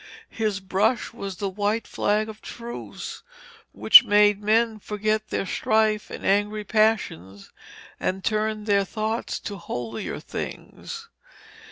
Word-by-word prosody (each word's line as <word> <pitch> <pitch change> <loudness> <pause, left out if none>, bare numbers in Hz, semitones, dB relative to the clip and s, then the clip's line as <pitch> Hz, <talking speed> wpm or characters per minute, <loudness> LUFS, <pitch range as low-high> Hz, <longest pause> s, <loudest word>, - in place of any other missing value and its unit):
His 215 -3 -1
brush 205 +6 0
was 200 -5 -6
the 200 +3 -3
white 205 +3 -1
flag 210 +1 0
of 220 -1 -10
truce 235 0 -8 0.5
which - - +8
made 205 -2 +4
men 220 +1 +2
forget 215 +1 -1
their - - -1
strife 215 +2 +1
and - - -7
angry 205 +2 +1
passions, 200 - 0 0.5
and 190 +1 -2
turned 215 -1 -1
their 200 -2 +3
thoughts 220 +4 -3
to 205 - -6
holier 120 -9 -5
things. - - -7
210 Hz, 125 wpm, -24 LUFS, 200-220 Hz, 0.5 s, which